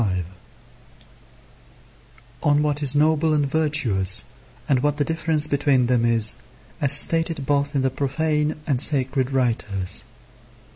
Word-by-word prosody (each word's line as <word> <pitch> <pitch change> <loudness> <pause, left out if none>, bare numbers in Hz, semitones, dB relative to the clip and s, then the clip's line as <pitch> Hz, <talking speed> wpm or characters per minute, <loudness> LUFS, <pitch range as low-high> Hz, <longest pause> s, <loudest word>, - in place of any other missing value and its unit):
On 145 0 +2
what 150 0 -2
is 145 -1 +3
noble 155 +1 +2
and 145 -1 +1
virtuous, 135 - +1 0.4
and 135 -3 +2
what 145 +2 -1
the 145 - 0
difference 160 -1 +2
between 140 -3 +1
them 120 -1 +1
is, 115 -2 +2 0.5
as 140 - +3
stated 165 0 +1
both 145 +1 -1
in 135 - 0
the 130 - 0
profane 150 +3 -1
and 130 -4 0
sacred 135 -3 0
writers. 115 -8 -2
145 Hz, 125 wpm, -22 LUFS, 130-150 Hz, 0.5 s, is